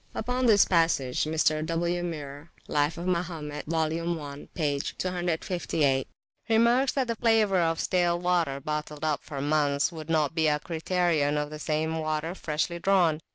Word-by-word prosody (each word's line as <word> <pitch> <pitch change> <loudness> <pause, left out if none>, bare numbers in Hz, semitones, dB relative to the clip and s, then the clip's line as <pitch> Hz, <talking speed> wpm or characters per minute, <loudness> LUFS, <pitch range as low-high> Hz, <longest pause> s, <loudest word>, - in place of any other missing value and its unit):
Upon 250 +2 0
this 205 -3 +6
passage 165 -8 +1
Mr. 155 0 +1
W. 170 +2 -1
Muir 150 -2 -6 0.2
(Life 145 +2 0
of 170 - -5
Mahomet, 165 -5 -3
vol. 160 -1 0 0.3
i, 140 0 -9
p. 145 -4 0
cclviii.) 175 -5 -1 0.4
remarks 235 +4 +3
that 270 -2 +1
the 230 -1 -2
flavour 220 -5 +3
of 165 -1 +1
stale 175 -1 +1
water 175 -6 0
bottled 150 +1 -4
up 150 -2 +1
for 145 -3 -6
months 145 0 +1
would 160 -1 -9
not 155 -2 +1
be 160 -1 +2
a 150 -1 +3
criterion 160 -2 0
of 150 0 -2
the 155 - -7
same 160 +2 -1
water 155 +1 -2
freshly 170 0 -2
drawn. 175 -5 +3
160 Hz, 155 wpm, -27 LUFS, 150-175 Hz, 0.4 s, this